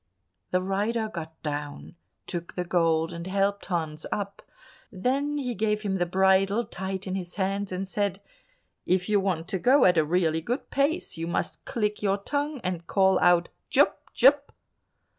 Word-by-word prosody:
The 185 0 +1
rider 215 +4 -1
got 160 -2 -7
down, 145 -1 -5 0.3
took 175 -1 -5
the 180 - -1
gold, 165 -2 +1
and 170 +1 -6
helped 200 +1 0
Hans 160 -4 -2
up; 200 -1 -3 0.5
then 275 +9 0 0.2
gave 210 0 0
him 195 -2 0
the 175 -1 0
bridle 190 +4 +3
tight 190 -2 -5
in 185 - -3
his 180 -2 -5
hands 195 0 -1
and 185 +1 -3
said, 200 0 -1 0.7
"If 180 0 +2
you 210 -1 +3
want 180 -4 -1
to 190 - -1
go 255 +7 +5
at 180 -2 +5
a - - +4
really 160 0 +1
good 245 - -4
pace, 280 - 0
you 165 +1 -3
must 170 - -3
click 210 -2 -1
your 200 -1 +2
tongue 285 +7 -2
and 175 -2 -3
call 190 -1 +3
out, 175 -1 +4 0.2
"Jup! - - +2
Jup!" 280 +3 +4
190 Hz, 165 wpm, -27 LUFS, 175-210 Hz, 0.7 s, go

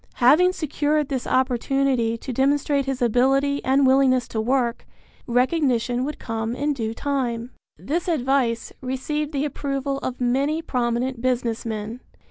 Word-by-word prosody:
Having 320 +9 +5
secured 300 -2 0
this 265 -3 -3
opportunity 255 -2 +1
to 255 +2 -6
demonstrate 280 +1 +1
his 265 -2 -1
ability 270 +4 +2
and 270 +1 +3
willingness 260 -2 +4
to 220 - -2
work, 240 0 0 0.4
recognition 250 -1 +1
would 300 +3 -4
come 225 +1 -3
in 290 +3 0
due 225 -4 -3
time. 250 -4 -2 0.3
This 335 +6 -3
advice 265 -7 0
received 285 +4 -3
the 285 -1 -1
approval 275 -1 -3
of 255 -2 -5
many 270 +5 +1
prominent 250 -4 -1
business 240 -3 -1
men. 220 +2 -4
260 Hz, 135 wpm, -23 LUFS, 240-280 Hz, 0.4 s, Having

